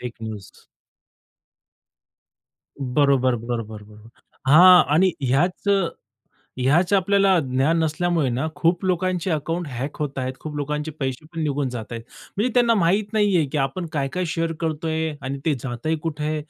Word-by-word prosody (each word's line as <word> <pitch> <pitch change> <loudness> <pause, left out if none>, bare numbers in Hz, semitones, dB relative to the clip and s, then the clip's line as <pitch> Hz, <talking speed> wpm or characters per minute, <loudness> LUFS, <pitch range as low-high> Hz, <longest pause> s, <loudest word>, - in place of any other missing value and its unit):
Fake 125 -1 -6
news. 105 -3 -7 2.3
बरोबर, 130 -1 +2
बरोबर, 115 -2 -5
बरोबर. 105 +1 -16 0.4
हां 180 +4 +8
आणि 185 +3 +4
ह्याच 150 +10 0
अ, 195 -4 +3 0.7
ह्याच 155 +9 +2
आपल्याला 195 -1 +3
ज्ञान 135 +3 +1
नसल्यामुळे 160 -2 0
ना 130 +6 -1
खूप 170 +4 +1
लोकांचे 185 0 0
अकाउंट 165 +2 -2
हॅक 135 +2 -5
होत 140 -2 -3
आहेत, 130 0 -2
खूप 155 -1 -7
लोकांचे 150 +2 -3
पैसे 130 +1 -3
पण 165 - -3
निघून 145 -2 -1
जात 120 -3 -7
आहेत. 115 -1 -5 0.4
म्हणजे 235 +5 +1
त्यांना 240 -2 +4
माहीत 200 +3 +1
नाहीये 200 -7 +3
की - - -1
आपण 135 +6 -1
काय-काय 145 +5 -1
शेअर 165 0 -1
करतोय 160 0 -1
आणि 135 +1 -4
ते 155 - +3
जातंय 135 +5 -2
कुठे, 155 -1 -2
155 Hz, 145 wpm, -22 LUFS, 130-175 Hz, 2.3 s, हां